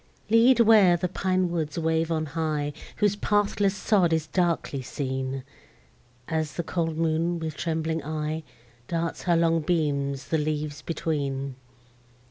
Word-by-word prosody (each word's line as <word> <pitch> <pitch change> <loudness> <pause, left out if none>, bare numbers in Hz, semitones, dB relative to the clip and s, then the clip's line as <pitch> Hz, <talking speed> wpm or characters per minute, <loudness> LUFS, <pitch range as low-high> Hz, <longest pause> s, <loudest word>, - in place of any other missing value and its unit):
Lead 235 +2 +6
where 210 -6 +6
the 180 +1 -1
pine 185 0 0
woods 160 -3 -2
wave 160 0 +1
on 155 -1 0
high, 150 -1 -2 0.2
Whose 205 -1 +2
pathless 205 -1 +1
sod 190 -4 +2
is 160 -1 +1
darkly 170 -5 0
seen, 130 0 -3 0.8
As 155 -3 -1
the 170 - -3
cold 165 -2 -2
moon, 165 +1 +1
with 160 -2 -4
trembling 160 -1 -2
eye, 155 +1 -3 0.5
Darts 165 0 -2
her 175 -2 +3
long 165 0 +3
beams 140 -4 -1
the 160 - +2
leaves 150 -1 -2
between. 140 -5 -2
160 Hz, 135 wpm, -26 LUFS, 150-175 Hz, 0.8 s, Lead